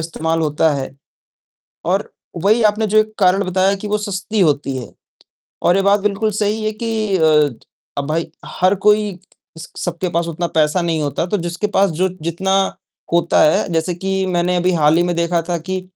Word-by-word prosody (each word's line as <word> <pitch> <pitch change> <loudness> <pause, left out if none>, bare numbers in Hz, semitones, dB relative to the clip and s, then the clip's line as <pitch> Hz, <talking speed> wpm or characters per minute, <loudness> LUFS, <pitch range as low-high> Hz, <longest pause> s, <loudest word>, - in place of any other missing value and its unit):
इस्तेमाल 160 0 -2
होता 155 +1 +2
है। 135 -2 -4 0.9
और 190 +4 -1 0.3
वही 220 +3 +4
आपने 215 +1 -2
जो 215 +1 +3
एक 215 0 +1
कारण 195 +1 +3
बताया 185 +2 +1
कि 210 - -4
वो 210 +1 0
सस्ती 205 +1 -3
होती 140 -5 +1
है 125 - -7 0.7
और 175 +2 +3
ये 195 - +2
बात 200 +1 +3
बिल्कुल 210 +2 0
सही 210 +1 -1
है 215 - 0
कि 220 -3 0
अ, 170 - 0 0.8
अब 140 - -2
भाई 165 +1 -2 0.3
हर 185 +2 +4
कोई 210 -3 +3 0.4
स 160 - -8
सबके 175 +1 -3
पास 170 0 0
उतना 170 +2 -2
पैसा 155 +3 +2
नहीं 165 -2 -1
होता, 145 +3 -1
तो 210 - -1
जिसके 175 +3 -3
पास 195 -1 +3
जो 180 +4 0
जितना 170 +4 -2 0.6
होता 170 0 +3
है, 155 - +3
जैसे 165 +2 0
कि 190 +2 -2
मैंने 180 0 0
अभी 180 +1 +1
हाल 155 -2 +3
ही 175 - +4
में 175 0 -1
देखा 170 0 +1
था 175 - 0
कि 185 +3 -4
180 Hz, 190 wpm, -18 LUFS, 165-200 Hz, 0.9 s, वही